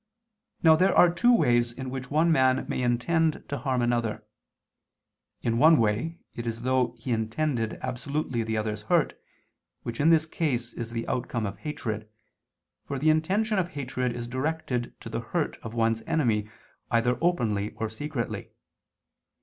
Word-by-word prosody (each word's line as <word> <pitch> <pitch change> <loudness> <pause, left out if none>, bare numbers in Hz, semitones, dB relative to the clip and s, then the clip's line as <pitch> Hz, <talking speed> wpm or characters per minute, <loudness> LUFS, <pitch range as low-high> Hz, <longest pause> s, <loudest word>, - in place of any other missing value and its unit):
Now 160 -1 +8
there 185 +4 +3
are 175 -1 +7
two 240 +8 +4
ways 120 - +3
in 130 +1 -6
which 130 -1 -5
one 160 +3 +3
man 130 -4 +3
may - - -2
intend 155 +7 +1
to 140 - -3
harm 130 -1 0
another. 120 -2 0 1.2
In 115 0 +1
one 160 +3 +7
way 115 +10 0 0.2
it 120 0 -5
is 115 -1 -2
as 120 - -11
though 130 -1 +1
he 130 - -6
intended 115 +1 -1
absolutely 130 0 -2
the 110 0 -2
other's 105 -1 -2
hurt, 105 - +2 0.7
which 115 -1 -5
in 150 +3 +4
this 160 -1 +5
case 130 -7 -1
is 115 -1 -5
the 115 0 -4
outcome 120 -2 -2
of 100 0 -5
hatred, 110 -6 -4 0.7
for 140 - -4
the 155 +4 +4
intention 195 +7 +1
of 175 - 0
hatred 130 -3 -2
is 120 -1 -4
directed 130 -1 -3
to - - -7
the - - -2
hurt - - -2
of 115 0 -7
one's 115 -1 +1
enemy 115 -11 +1 0.4
either 120 +1 +2
openly 110 - +1
or 110 - -3
secretly. 120 +2 -4
125 Hz, 165 wpm, -27 LUFS, 115-155 Hz, 1.2 s, Now